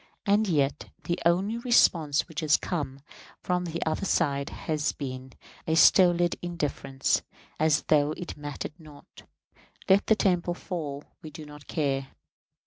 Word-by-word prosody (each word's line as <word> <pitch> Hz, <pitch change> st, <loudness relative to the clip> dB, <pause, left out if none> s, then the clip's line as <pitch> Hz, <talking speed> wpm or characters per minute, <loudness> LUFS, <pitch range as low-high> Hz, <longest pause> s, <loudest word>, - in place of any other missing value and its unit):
And 210 Hz, +2 st, +3 dB
yet, 145 Hz, -6 st, 0 dB
the 175 Hz, -, -2 dB
only 195 Hz, +7 st, +1 dB
response 165 Hz, -, +3 dB
which 160 Hz, -4 st, -6 dB
has 155 Hz, -2 st, +3 dB
come 140 Hz, -6 st, -4 dB, 0.4 s
from 180 Hz, 0 st, 0 dB
the 170 Hz, 0 st, -3 dB
other 160 Hz, +5 st, -1 dB
side 140 Hz, -4 st, 0 dB
has 155 Hz, -2 st, -2 dB
been 130 Hz, -2 st, -7 dB, 0.3 s
a 160 Hz, -, +2 dB
stolid 175 Hz, 0 st, +5 dB
indifference, 150 Hz, -6 st, -1 dB, 0.4 s
as 155 Hz, -1 st, +3 dB
though 150 Hz, -1 st, +3 dB
it 175 Hz, -, -7 dB
mattered 145 Hz, +2 st, -7 dB
not: 150 Hz, -3 st, -15 dB, 0.7 s
"Let 195 Hz, +1 st, +4 dB
the 220 Hz, -, +5 dB
temple 175 Hz, -4 st, +1 dB
fall, 150 Hz, -7 st, -5 dB, 0.2 s
we 155 Hz, -, -8 dB
do 155 Hz, +1 st, -10 dB
not 150 Hz, -1 st, -13 dB
care!" 135 Hz, -3 st, -1 dB
155 Hz, 140 wpm, -27 LUFS, 145-175 Hz, 0.7 s, stolid